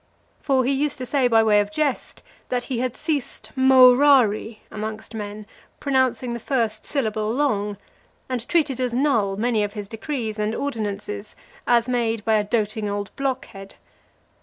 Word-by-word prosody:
For 265 -3 +1
he 265 - +2
used 280 +1 0
to 255 - -5
say 265 -1 +2
by 225 -2 +4
way 210 -1 +4
of 205 0 -1
jest, 295 +1 -2 0.3
that 245 -1 -1
he 250 -3 -3
had 255 0 -2
ceased 280 -8 -3
morari 255 -4 +5
amongst 215 +1 -6
men, 210 -1 -6 0.3
pronouncing 260 -3 +1
the 235 - -4
first 225 -4 -1
syllable 220 -6 -1
long; 210 -7 0 0.5
and 250 -2 -4
treated 295 -7 +1
as 250 -2 -1
null 230 -8 +1
many 225 -1 +1
of 205 0 -3
his 205 -2 -6
decrees 225 -1 -4
and 210 +2 -1
ordinances, 210 -5 -4 0.3
as 235 -1 +3
made 230 -3 -1
by 220 - +2
a 215 -1 +3
doting 210 0 -1
old 200 -1 -4
blockhead. 250 -8 -4
230 Hz, 160 wpm, -23 LUFS, 210-260 Hz, 0.5 s, morari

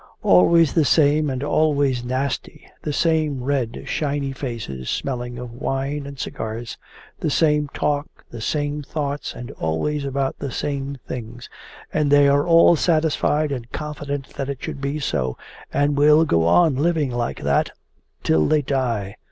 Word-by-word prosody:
'Always 145 - +5
the 165 - +4
same 150 +1 +3
and 130 0 -3
always 145 -4 +1
nasty! 130 +2 -3 0.2
The 150 - -3
same 155 -4 +1
red 130 -4 -1
shiny 145 -2 -1
faces 115 - -5
smelling 125 -2 -3
of 125 -1 -7
wine 135 +3 -3
and 140 -1 -9
cigars! 115 -1 -5 0.4
The - - -1
same 150 0 +2
talk, 145 0 -1 0.2
the 120 - -7
same 145 +4 -1
thoughts, 145 0 -4
and 120 +2 -7
always 140 - -2
about 135 -1 -2
the 140 - -3
same 140 +1 -3
things! 120 +1 -7 0.4
And 150 -2 +1
they 145 0 +6
are 145 +3 +3
all 170 0 +6
satisfied 155 -2 +1
and 125 -3 -5
confident 145 -2 -5
that 135 - -3
it 140 -1 -5
should 140 - -5
be 140 +2 -2
so, 70 - -2 0.3
and 145 +1 +1
will 150 +2 +5
go 85 - +2
on 155 - +4
living 155 -2 +1
like 120 -1 -2
that - - +1 0.5
till 80 -1 +3
they 150 -1 +2
die. 115 -7 -1
140 Hz, 155 wpm, -22 LUFS, 125-150 Hz, 0.5 s, they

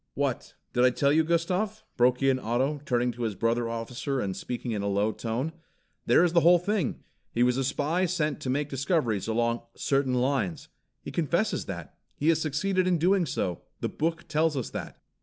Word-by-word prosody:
"What, - - -2 0.2
did 125 - +3
I 125 - +7
tell 140 +3 +2
you, 160 +1 +4
Gustav?" 185 +6 0
broke 125 +2 +3
in 135 -1 +3
Otto, 130 +6 0
turning 125 0 +1
to 120 - -9
his 110 -4 -1
brother 115 +3 0
officer 120 +4 -3
and 95 -5 -2
speaking 125 0 -4
in 105 -2 -1
a 100 - -2
low 100 +2 +1
tone. 120 +8 -3 0.6
"There - - +6
is 175 -2 +2
the 170 - +6
whole 175 +2 +6
thing! 185 -3 -1 0.3
He 120 - +2
was 125 0 +3
a 135 - 0
spy 155 +7 0
sent 155 -4 -1
to 130 - -4
make 140 +3 0
discoveries 135 - 0
along 115 +1 +1
'certain 135 -2 +1
lines.' 125 - 0 0.3
He - - -6
confesses 170 +6 0
that. 85 -4 -7 0.2
He 150 - +1
has 160 -1 +3
succeeded 185 +5 0
in 180 -2 +3
doing 180 +1 +3
so. 90 - -2 0.2
The - - -2
book 165 +2 -2
tells 155 -1 +1
us 125 - -3
that." - - -6
135 Hz, 195 wpm, -28 LUFS, 120-165 Hz, 0.6 s, I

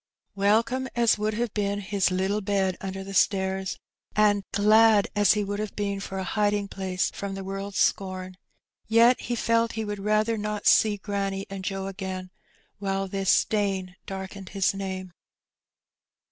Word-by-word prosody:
Welcome 225 +6 +2
as 235 -3 +3
would 215 0 -1
have 235 -1 -2
been 205 -1 -1
his 200 -2 0
littJe 190 +3 0
bed 190 -2 +1
under 195 0 -5
the 195 0 -8
stairs, 190 -1 +1 0.4
and 205 -1 +3
glad 215 0 +5
as 205 -1 +5
he 210 -1 0
would 205 +1 -3
have 215 -1 -4
been 200 -1 -2
for 195 0 -6
a 190 - -2
hiding 205 +1 0
place 185 -1 -2
from 200 -1 -5
the 195 - -6
world's 195 +1 -5
scorn, 185 -1 0 0.5
yet 230 +3 +5
he 240 - -2
felt 230 0 +1
he 220 -1 -3
would 205 -1 -4
rather 215 +2 +1
not 210 0 -3
see 210 -2 +5
granny 195 -1 -3
and 195 -1 -6
Joe 195 0 -3
again 190 -1 -5 0.5
while 195 -1 -1
this 195 0 -2
stain 195 -3 +1
darkened 190 0 -7
his 195 -1 +1
name. 190 -2 -5
200 Hz, 160 wpm, -26 LUFS, 190-210 Hz, 0.5 s, glad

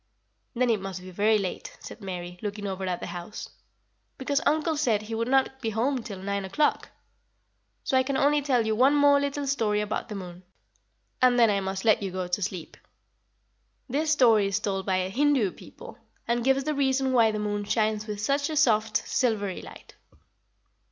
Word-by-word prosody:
"Then 245 0 +2
it 215 -4 0
must 190 -1 -5
be 185 0 -10
very 210 +4 +3
late," 195 -3 -5
said - - -11
Mary, 180 -2 -6
looking 205 -1 -5
over 190 -1 -3
at 180 -1 -2
the - - -4
house; 175 +4 -7 0.7
"because 280 +2 -1
uncle 315 +2 +1
said 230 -8 +1
he 220 +2 -7
would 230 +1 -1
not 265 0 +1
be 225 - -1
home 245 +4 0
till 205 -3 -7
nine 200 +1 -3
o'clock. 245 +11 0 0.9
So - - -1
I 260 - +5
can 265 +1 -1
only 290 +2 +3
tell 255 -5 +1
you 220 - +1
one 265 +5 +4
more 285 -1 +5
little 285 0 -2
story 225 -7 0
about 210 0 -3
the 210 - -5
moon, 180 -2 -8 0.8
and 250 -1 +5
then 230 -3 +5
I 200 - +1
must 190 +1 -4
let 215 -2 +4
you 195 - -2
go 185 0 -4
to 180 +3 -1
sleep. 185 -3 -5 1.1
This 295 +5 -1
story 230 -9 +4
is 200 +1 0
told 195 -2 -3
by 185 -1 +1
the - - -8
Hindoo 275 -7 +2
people, - - -13 0.3
and 235 0 0
gives 270 +1 +2
the 305 +2 -1
reason 265 -2 +1
why 230 -3 +5
the 215 - -2
moon 205 -1 -2
shines 215 0 0
with 210 -1 -5
such 280 +7 0
a 310 - -3
soft, 225 -7 +2
silvery 205 -6 0
light." - - -13
220 Hz, 195 wpm, -26 LUFS, 200-265 Hz, 1.1 s, I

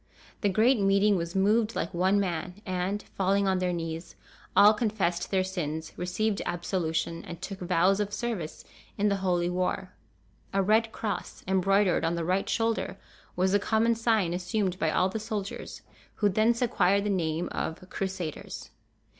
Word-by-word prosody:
The 205 - +2
great 220 +5 +4
meeting 200 +1 +4
was 170 0 -3
moved 215 +3 +2
like 170 - -2
one 190 +3 +3
man; 180 -2 -2
and, 185 +2 -2
falling 195 +1 +2
on 190 -1 +2
their 180 -1 0
knees, 165 -1 -5 0.4
all 205 +1 +8
confessed 205 -6 -1
their 190 -1 +2
sins, 160 -4 -4
received 195 +4 -1
absolution, 170 -2 -2
and 170 -1 -8
took 190 +1 -6
vows 180 +2 +2
of 205 -1 -1
service 205 -8 -4 0.3
in 205 +1 +2
the 200 - +1
Holy 180 -2 +1
War. 185 +1 -2 0.6
A 195 0 +2
red 220 +3 +3
cross, 205 -7 -4
embroidered 190 -1 +3
on 165 +1 +1
the 170 -1 -2
right 185 +3 0
shoulder, 225 0 0 0.4
was 185 +1 +2
the 205 - +4
common 220 +3 +2
sign 225 -6 +1
assumed 185 +1 -1
by 160 - +2
all 180 +4 +2
the 195 +4 -3
soldiers, 210 -2 -5 0.3
who 205 - +2
thence 225 +5 +2
acquired 200 -3 +2
the 210 - 0
name 165 -3 -1
of 160 +3 -4
"Crusaders." 190 -5 -5
190 Hz, 165 wpm, -28 LUFS, 175-205 Hz, 0.6 s, all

